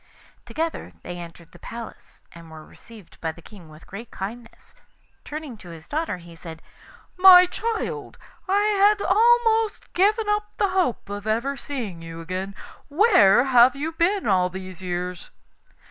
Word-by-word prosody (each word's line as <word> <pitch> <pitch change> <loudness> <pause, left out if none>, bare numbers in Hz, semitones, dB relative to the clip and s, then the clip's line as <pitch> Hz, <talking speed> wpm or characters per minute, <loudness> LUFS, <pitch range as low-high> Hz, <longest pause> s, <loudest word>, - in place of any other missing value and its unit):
Together 325 +1 -4
they 175 0 -7
entered 170 -1 -12
the 175 - -16
palace, 230 +4 -10
and 170 -1 -14
were 155 -1 -12
received 220 -6 -17
by 160 - -2
the 165 - -16
King 175 -1 -15
with 155 +1 -15
great 220 +4 -9
kindness. 230 +5 -9 0.5
Turning 300 -4 -7
to 185 -4 -13
his 165 -1 -12
daughter, 315 - -2
he 170 -1 -14
said: 165 -1 -11 0.5
'My 365 -1 +9
child, 450 +3 -4 0.3
I 400 +2 +3 0.2
had 410 +1 +5
almost 450 0 +2
given 420 +4 +2
up 420 0 0
the 400 - +1
hope 365 - -1
of 205 +1 -7
ever 235 +6 0
seeing 235 -12 -6
you 165 0 -9
again. 185 +3 -5 0.3
Where 290 - +5
have 255 0 +5
you 300 +4 -3
been 360 +5 0
all 185 -3 +2
these 185 -1 -9
years? 180 -1 -5
230 Hz, 155 wpm, -23 LUFS, -, 0.5 s, My